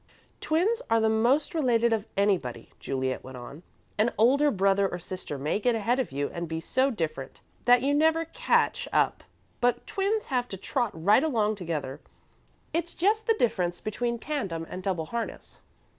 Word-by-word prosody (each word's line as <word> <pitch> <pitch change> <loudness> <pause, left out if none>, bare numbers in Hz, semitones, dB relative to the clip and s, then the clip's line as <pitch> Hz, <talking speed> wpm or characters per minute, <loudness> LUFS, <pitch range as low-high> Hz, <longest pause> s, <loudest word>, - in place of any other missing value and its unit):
"Twins 390 +10 +1
are 225 - +4
the 220 0 +3
most 240 +9 +2
related 235 -7 +2
of 220 -1 -2
anybody," 180 - 0
Juliet 130 -1 -2
went 130 -1 -9
on. 130 +5 -10 0.4
"An 225 +3 +3
older 275 +7 +4
brother 195 -3 +2
or 175 - -4
sister 180 -4 -6
may 150 +8 -1
get 240 +1 +2
ahead 230 +4 +1
of 260 - -2
you 140 +1 -2
and 170 0 -4
be 160 0 -3
so 260 +10 +1
different 155 - -4 0.2
that 245 0 +5
you 280 +1 +2
never 320 +2 +3
catch - - +1
up, - - +1 0.4
but 245 0 +1
twins 410 +2 -1
have 250 -3 -1
to 195 - -6
trot 240 +4 -1
right 195 - +4
along 220 -9 +1
together. 155 -8 -4 0.7
It's 340 +1 -2
just 430 +5 +1
the 450 - +4
difference 180 - 0
between 235 +2 -2
tandem 200 - -3
and 185 - -5
double 180 -4 -2
harness." 235 +6 -5
220 Hz, 175 wpm, -27 LUFS, 175-275 Hz, 0.7 s, that